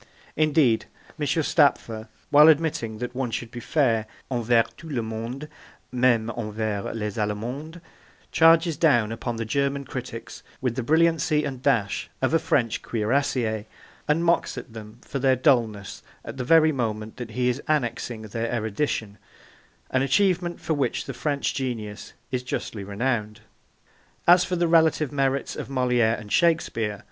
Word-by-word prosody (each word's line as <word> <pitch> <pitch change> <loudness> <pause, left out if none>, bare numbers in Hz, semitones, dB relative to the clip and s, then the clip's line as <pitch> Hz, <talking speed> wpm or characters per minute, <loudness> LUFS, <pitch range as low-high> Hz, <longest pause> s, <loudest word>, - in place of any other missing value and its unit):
Indeed, 150 -7 +3 0.3
M. 145 - -1
Stapfer, 135 -7 +1 0.2
while 150 +1 +8
admitting 150 -8 +2
that 125 +2 -5
one 130 -1 -2
should 115 0 -4
be 120 - -7
fair 115 -5 +1 0.2
'envers 120 -1 +3
tout 165 -2 -10
le 120 -5 -1
monde, 115 +6 -5 0.4
meme 120 -3 +2
envers 110 -2 -3
les 105 -1 -3
Allemands,' 120 +10 -3 0.5
charges 165 -1 +5
down 120 -10 +3
upon 115 +1 -4
the 115 0 -3
German 140 +3 -1
critics 125 -3 -7 0.2
with 125 -3 -1
the 130 - -1
brilliancy 160 +2 +2
and 135 -4 -5
dash 105 -8 0
of 130 +3 0
a 165 - +5
French 120 -7 0
cuirassier, 115 -1 -1 0.4
and 165 +3 +2
mocks 170 0 +1
at 115 - -8
them 110 0 -10
for 140 - -4
their 130 0 +3
dulness, 115 -6 +1 0.2
at - - -7
the 130 - -2
very 160 +4 +5
moment 110 -5 -3
that 120 -3 -6
he 125 -1 +2
is 125 +3 0
annexing 120 -5 -1
their 115 +2 -3
erudition, 110 -2 -2 0.7
an 130 - +2
achievement 175 +4 +1
for 160 - -2
which 145 -3 -1
the 135 - -5
French 140 +3 -1
genius 115 -6 -5 0.2
is 125 -1 -1
justly 115 -4 -4
renowned. 105 +1 -2 0.9
As 175 +1 +7
for 180 - -2
the 175 -1 +1
relative 160 -3 +3
merits 135 -1 0
of - - -6
Moliere 125 -4 +2
and 105 -2 -10
Shakespeare, 155 -10 +2
M. 100 - -11
125 Hz, 155 wpm, -25 LUFS, 110-150 Hz, 0.9 s, while